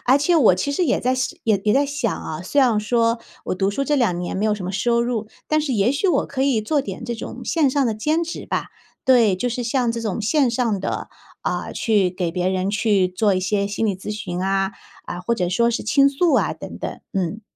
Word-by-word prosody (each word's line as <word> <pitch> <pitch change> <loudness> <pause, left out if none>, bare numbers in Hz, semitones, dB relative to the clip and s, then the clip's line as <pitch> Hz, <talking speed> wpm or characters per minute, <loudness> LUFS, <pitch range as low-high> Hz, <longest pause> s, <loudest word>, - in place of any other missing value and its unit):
而 260 - +6
且 295 +5 +2
我 230 - +6
其 235 +11 -2
实 355 +5 +1
也 255 - +2
在 255 +1 +1
想 260 +7 -2
也 220 -4 +3 0.2
在 280 - +4
想 280 -5 -1
啊， 155 0 -6
虽 285 - -2
然 240 -5 +4
说 230 +1 +1 0.3
我 - - -2
读 195 +2 0
书 275 +7 -2
这 295 - +1
2 230 -10 +2
年 175 - -4
没 210 - 0
有 215 - +2
什 205 -3 -6
么 185 - -3
收 235 +4 +1
入， 235 -3 -2 0.2
但 310 0 +2
是 295 -3 -2
也 215 +5 +2
许 335 +8 0
我 285 -6 +2
可 265 - -5
以 270 -5 +2
做 290 +6 +1
点 195 -7 -6
这 235 - -3
种 225 - -7
线 315 -5 +2
上 275 +1 +1
的 225 - 0
兼 310 +10 0
职 335 - -7
吧。 - - -2 0.4
对， 230 -7 +5
就 245 - -2
是 245 +1 -3
像 240 0 +1
这 230 - -4
种 215 -3 -2
线 260 +4 +2
上 230 -5 0
的， - - -3 0.3
呃， - - -2
去 210 -5 +2
给 180 -2 -2
别 180 +1 -1
人 190 +1 0
去 205 -3 +2
做 195 +2 +1
一 185 - 0
些 200 +2 0
心 205 +2 -2
理 200 - 0
咨 195 - -7
询 185 -4 -4
啊， 195 0 0 0.3
呃， 175 - -5
或 210 +6 0
者 180 -5 -1
说 235 +6 +2
是 235 - -2
倾 275 +4 +4
诉 305 +4 +1
啊， - - +2
等 - - -9
等， - - -5
嗯。 195 +3 -2
225 Hz, 265 characters per minute, -22 LUFS, 195-265 Hz, 0.4 s, 而